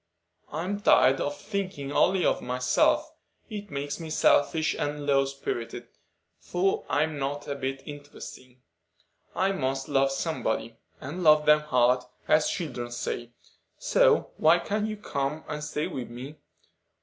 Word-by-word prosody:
"I'm 180 +7 -3
tired 135 -9 +5
of 145 0 -2
thinking 185 -9 -4
only 185 +5 +3
of - - +2
myself. 125 +1 +1 0.4
It 205 -1 -6
makes 145 +1 -4
me 165 -1 -6
selfish 155 0 +3
and 145 0 -3
low 135 -1 +3
spirited; 135 -4 -5 0.5
for 180 - 0
I'm 150 0 0
not 145 +1 -3
a 145 - -2
bit 135 -1 -4
interesting. 145 -3 -11 0.7
I 190 +1 +2
must 135 -6 -2
love 135 -1 +3
somebody, 115 -6 -2 0.2
and 150 +7 -6
'love 155 -2 +6
them 150 0 +6
hard,' 125 -4 +2 0.2
as 155 0 +4
children 125 -9 -4
say; 120 0 -4 0.5
so - - +3
why 160 +2 +5
can't 210 +4 -1
you 215 -1 -4
come 150 -5 -3
and 150 -1 -4
stay 150 0 -2
with 125 -2 -5
me? 130 +6 -8
145 Hz, 140 wpm, -27 LUFS, 135-160 Hz, 0.7 s, love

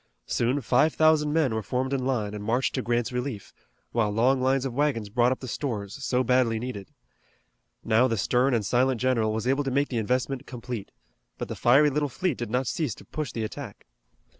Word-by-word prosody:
Soon 125 +4 0
five 150 +6 +2
thousand 155 -1 +4
men 150 -6 +2
were 110 - -1
formed 130 +4 -2
in 135 -2 0
line 115 -6 -1
and 105 -1 -6
marched 120 +5 0
to 130 - -1
Grant's 120 0 0
relief, 125 -4 -4 0.4
while 115 -3 +1
long 125 +5 +2
lines 135 +1 +2
of 130 - -3
wagons 125 -6 0
brought 120 +3 +3
up 130 - -2
the 130 - -6
stores 115 -2 -4
so 125 -1 +1
badly 125 -2 +2
needed. 110 -4 -6 0.9
Now 115 +3 +3
the 115 - -1
stern 125 +5 +2
and 110 -3 -1
silent 125 +2 +2
general 115 -4 +1
was 110 +2 -2
able 135 +3 +1
to 135 - -2
make 140 +2 +1
the 120 - -1
investment 125 +4 -1
complete, 120 -4 -6 0.5
but - - -5
the - - -4
fiery 140 +5 +4
little 145 +1 0
fleet 180 +1 -2
did 120 - -4
not 125 +4 0
cease 145 - -2
to - - -15
push 150 -6 -4
the 115 - -3
attack. 110 - -7
125 Hz, 210 wpm, -26 LUFS, 115-135 Hz, 0.9 s, thousand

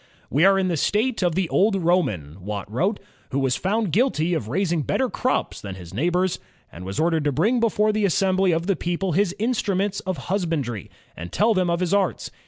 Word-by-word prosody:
"We 150 +7 +4
are 195 0 +5
in 190 -1 +1
the 170 -3 0
state 220 - 0
of 175 -3 +1
the 190 -2 +1
old 200 +2 +3
Roman," 105 - 0
Watt 100 0 -4
wrote, 190 - 0 0.2
" - - -33
who 135 - -2
was 135 -2 +1
foimd 200 - -1
guilty 180 - +1
of 140 -10 -2
raising 170 - 0
better 255 - 0
crops 255 - -1
than 100 -2 -6
his 90 -2 -11
neighbors, 175 - 0 0.3
and 85 - -10
was 95 +1 -4
ordered 160 -1 +2
to 145 - +2
bring 210 - +2
before 215 -2 +2
the 215 -1 +1
assembly 190 0 +2
of 165 +1 0
the 195 0 +1
people 175 +3 -2
his 185 +2 +1
instnmients 205 -4 0
of 185 -3 -1 0.2
husbandry, 150 - -2 0.3
and 85 +2 -8
tell 220 +2 +3
them 185 -3 +1
of 170 +1 0
his 180 +1 0
arts. 195 -3 0
180 Hz, 210 wpm, -23 LUFS, 145-200 Hz, 0.3 s, are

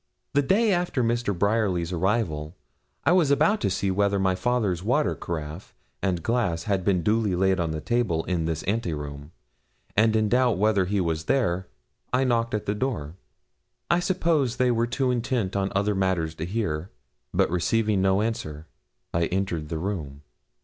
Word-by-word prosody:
The 145 - +4
day 205 +8 +3
after 175 -7 0
Mr. 115 -4 0
Bryerly's 100 -4 +1
arrival, 90 -4 -1 0.5
I 150 - +4
was 175 -5 +4
about 210 +9 +3
to - - +1
see 95 +1 0
whether 100 +1 +2
my 95 -1 +2
father's 100 -3 0
water 125 +9 +1
caraffe 80 +1 -6 0.3
and 90 -3 -1
glass 105 -9 0
had 100 -3 0
been 90 -2 +1
duly 105 -2 +1
laid 95 +1 +2
on 85 -2 0
the 80 -1 -3
table 115 -9 0
in 85 -3 -1
this 80 -1 -2
ante 100 -5 -1
room, 75 0 -7 0.6
and 110 +1 +4
in 110 -1 +2
doubt 125 -1 +3
whether 100 -1 +3
he 100 +2 0
was 80 -2 -1
there, 95 -8 +1 0.4
I 125 +1 +2
knocked 115 -3 +1
at 105 - -3
the 100 - 0
door. 105 - -3 0.8
I 170 - +4
suppose 165 - +1
they 125 -2 +2
were 115 0 +1
too 125 +2 0
intent 120 -5 -1
on 100 0 0
other 100 +1 +2
matters 95 -5 0
to 80 - -2
hear, 90 -5 -2 0.4
but - - +1
receiving 105 +3 +1
no 95 +2 +3
answer, 80 -9 -4 0.5
I 85 0 +1
entered 90 -5 -2
the 80 - -2
room. 80 -6 -4
100 Hz, 175 wpm, -25 LUFS, 85-120 Hz, 0.8 s, The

